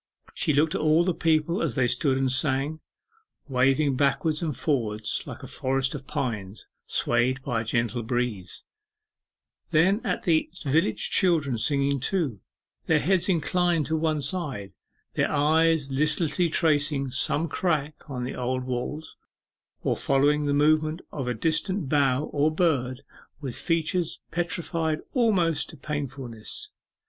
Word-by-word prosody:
She 160 - +1
looked 150 +2 +2
at - - -1
all 155 +2 +4
the 180 0 +1
people 160 +1 +1
as 150 -8 -1
they 130 - +2
stood 130 +3 +2
and 135 -1 +1
sang, 135 +3 +1 0.7
waving 135 +2 +2
backwards 145 +2 +1
and 155 -7 -2
forwards 110 -7 -1
like - - -8
a - - -7
forest 135 0 -1
of 135 -3 -7
pines 115 -9 -4 0.2
swayed 125 +3 +1
by 115 -3 -1
a - - -4
gentle 115 +1 -1
breeze; 115 -6 -3 1.1
then 190 +8 +3
at 180 - -2
the 160 -2 +2
village 145 -5 +1
children 160 -9 +3
singing 140 +2 +1
too, 140 - 0 0.5
their 160 - +4
heads 180 +5 +2
inclined 175 -2 +1
to 160 - 0
one 155 -1 0
side, 140 - -2 0.4
their - - 0
eyes 155 0 +2
listlessly 150 +4 +1
tracing 145 -4 +1
some 145 +5 +1
crack 155 -2 -1 0.2
in 125 -3 -4
the 125 - -4
old 125 +1 -2
walls, 130 +5 -5 0.7
or - - +1
following 145 +2 +2
the - - +1
movement 155 +2 +2
of 135 -4 -4
a 125 - -1
distant 165 - 0
bough 140 -2 +2
or 145 +1 +3
bird 140 -6 0 0.4
with 135 -5 -4
features 165 +1 -1
petrified 165 -2 -2
almost 180 - +2
to 160 - -9
painfulness. 135 -6 -4
145 Hz, 140 wpm, -26 LUFS, 130-160 Hz, 1.1 s, all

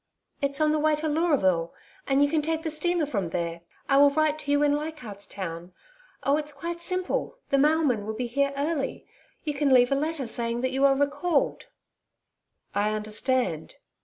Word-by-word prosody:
'It's 280 0 -1
on 305 0 +3
the 305 - +1
way 305 0 +3
to 310 +1 -3
Leuraville, 275 - +1 0.3
and 275 +1 +4
you - - +4
can 315 -1 +2
take 320 +1 -1
the 320 - -2
steamer 345 +1 0
from 200 - -2
there. 170 0 -3 0.3
I 275 - +4
will 285 0 +7
write 310 +1 +1
to 285 - -3
you 290 0 +3
in 290 -1 +3
Leichardt's 295 -10 -6
Town. 175 -2 -6 0.5
Oh, 280 +1 +3
it's 300 -1 -3
quite 340 +4 -6
simple. 370 +8 -2
The 275 - +3
mailman 290 -8 +2
will 220 - -3
be 250 - -2
here 280 +4 0
early. 290 0 -2 0.4
You 300 - -2
can 285 -1 +1
leave 245 -1 +5
a - - +4
letter 300 -1 -2
saying 235 0 -2
that 260 0 0
you 270 +1 +2
are 275 -1 +5
recalled.' 285 +3 0 1.1
'I 210 +1 +1
understand.' 215 - -1
280 Hz, 190 wpm, -26 LUFS, 235-310 Hz, 1.1 s, will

